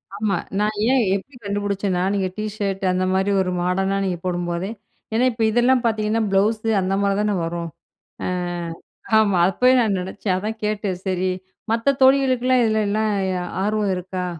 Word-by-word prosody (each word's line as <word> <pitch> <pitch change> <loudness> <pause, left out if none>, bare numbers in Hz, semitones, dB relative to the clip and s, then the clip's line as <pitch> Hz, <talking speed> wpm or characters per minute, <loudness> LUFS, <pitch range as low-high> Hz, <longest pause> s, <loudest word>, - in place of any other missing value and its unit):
ஆமா. 205 -1 0 0.2
நான் 210 +1 0 0.2
ஏன்? 265 -1 +4
எப்படி 250 +8 -7
கண்டுபிடிச்சேன்னா, 200 -2 -1
நீங்க 195 -2 0
டீ 215 - -2
ஷர்ட் 195 -1 -2
அந்த 185 0 0
மாதிரி 190 +2 +1
ஒரு 180 -1 -1
மாடர்னா 190 +2 0
நீங்க 180 -2 -1
போடும்போதே 175 +1 -2 0.4
ஏன்னா 235 +3 +3
இப்ப 225 -1 -2
இதெல்லாம் 245 +2 +3
பார்த்தீங்கன்னா, 220 0 +1
ப்ளவுஸு 215 +3 +1
அந்த 185 +1 -1
மாதிரி 200 0 +1
தானே 210 0 +1
வரும், 170 0 -4 0.6
ஆ. - - -1 0.9
ஆமா. 200 -4 +2
அப்பவே 250 +7 +3
நான் 210 -4 +1
நினைச்சேன் 190 +1 -2
அதான் 215 +3 -4
கேட்டேன், 210 -3 -2
சரி 185 0 0 0.4
மத்த 235 +5 +2
தோழிகளுக்கெல்லாம் 255 -2 +4
இதில 220 -1 +1
எல்லாம் 215 +1 +1 0.2
எ 185 - -1 0.3
ஆர்வம் 210 -1 0
இருக்கா? 180 0 -4
205 Hz, 160 wpm, -22 LUFS, 185-225 Hz, 0.9 s, ஏன்